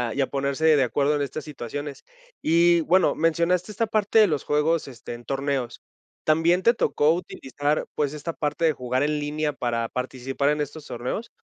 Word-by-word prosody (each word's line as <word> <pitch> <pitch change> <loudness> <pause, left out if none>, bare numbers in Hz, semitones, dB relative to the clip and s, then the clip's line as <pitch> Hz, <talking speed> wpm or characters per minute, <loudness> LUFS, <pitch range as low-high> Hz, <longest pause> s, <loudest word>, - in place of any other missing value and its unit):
y 140 - +1
a 135 - +1
ponerse 140 +3 +2
de 135 - +4
acuerdo 140 +4 +1
en 145 - -1
estas 140 +2 -4
situaciones. 145 0 -6 0.4
Y 170 +1 +4
bueno, 180 +4 +3
mencionaste 170 +4 +1
esta 225 +2 -1
parte 215 0 +2
de 215 - +7
los 150 -6 -1
juegos, 150 +1 +1
este, 120 -2 -9
en 120 0 -10
torneos. 135 -3 -2 0.5
¿También 165 +3 +3
te 235 - +5
tocó 155 -9 +2
utilizar, 145 -3 -2
pues, 145 -1 0
esta 155 +2 -5
parte 150 +2 -1
de 160 - +3
jugar 125 0 -1
en 150 0 0
línea 150 0 -2
para 115 -3 -2
participar 130 +3 -2
en 150 0 0
estos 145 +1 -6
torneos? 125 - -4
150 Hz, 185 wpm, -24 LUFS, 135-165 Hz, 0.5 s, de